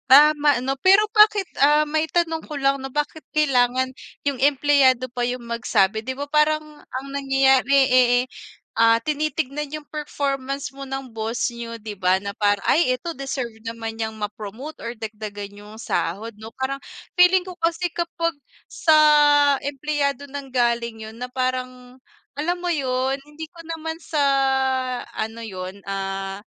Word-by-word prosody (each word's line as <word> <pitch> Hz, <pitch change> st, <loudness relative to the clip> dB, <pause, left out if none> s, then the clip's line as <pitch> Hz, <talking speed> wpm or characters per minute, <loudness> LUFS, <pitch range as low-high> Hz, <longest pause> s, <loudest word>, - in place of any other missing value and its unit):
Tama 295 Hz, +1 st, +6 dB
'no, 265 Hz, +1 st, 0 dB
pero 390 Hz, +3 st, +6 dB
bakit, 425 Hz, -2 st, +6 dB, 0.2 s
ah, 295 Hz, +2 st, +5 dB
maitanong 320 Hz, +2 st, 0 dB
ko 300 Hz, -, -6 dB
lang 275 Hz, 0 st, +2 dB
'no, 270 Hz, -, -5 dB
bakit 295 Hz, +1 st, -2 dB
kailangan 260 Hz, -3 st, +2 dB, 0.3 s
yung 280 Hz, -3 st, -1 dB
empleyado 275 Hz, -2 st, +4 dB
pa 245 Hz, -, -4 dB
yung 245 Hz, -1 st, -4 dB
magsabi 220 Hz, -3 st, +1 dB
di 260 Hz, +3 st, -5 dB
ba 285 Hz, -, -3 dB
parang 305 Hz, +1 st, +3 dB, 0.2 s
ang 260 Hz, +2 st, -7 dB
nangyayari 270 Hz, -1 st, +3 dB
eh, 245 Hz, -1 st, +5 dB, 0.5 s
ah, 230 Hz, 0 st, +6 dB
tinitignan 300 Hz, -1 st, -2 dB
yung 305 Hz, -1 st, -7 dB
performance 275 Hz, -3 st, -3 dB
mo 275 Hz, 0 st, -8 dB
ng 270 Hz, -1 st, -5 dB
boss 225 Hz, +2 st, -2 dB
niyo 235 Hz, -1 st, -6 dB
di 215 Hz, -1 st, -7 dB
ba 185 Hz, -1 st, +2 dB
na 200 Hz, -, -3 dB
parang, 205 Hz, -1 st, +1 dB
"Ay 270 Hz, -6 st, +3 dB
ito, 335 Hz, +7 st, -6 dB
deserve 260 Hz, -5 st, -5 dB
naman 225 Hz, -1 st, -5 dB
niyang 220 Hz, -1 st, -3 dB
ma-promote 215 Hz, +7 st, -7 dB
or 235 Hz, -, -4 dB
dagdagan 210 Hz, -2 st, -7 dB
yung 210 Hz, +1 st, -12 dB
sahod", 225 Hz, 0 st, -2 dB
'no, 220 Hz, +1 st, -8 dB
parang 265 Hz, +1 st, -3 dB, 0.4 s
feeling 360 Hz, +1 st, +6 dB
ko 370 Hz, -, -7 dB
kasi 335 Hz, +1 st, 0 dB
kapag 335 Hz, -1 st, -2 dB, 0.4 s
sa 315 Hz, -2 st, +3 dB, 0.7 s
empleyado 285 Hz, 0 st, -2 dB
nanggaling 240 Hz, -5 st, -1 dB
yun 220 Hz, -, -11 dB
na 250 Hz, -, -4 dB
parang 255 Hz, 0 st, -4 dB, 0.4 s
alam 345 Hz, +4 st, 0 dB
mo 355 Hz, -, 0 dB
yun, 265 Hz, -2 st, 0 dB
hindi 300 Hz, +2 st, -9 dB
ko 345 Hz, -, -17 dB, 0.2 s
naman 320 Hz, 0 st, -5 dB
sa 320 Hz, -2 st, -5 dB, 1.0 s
ano 225 Hz, +1 st, -4 dB
yun, 190 Hz, -1 st, -7 dB
ah, 195 Hz, 0 st, -4 dB
265 Hz, 150 wpm, -23 LUFS, 230-300 Hz, 1.0 s, Tama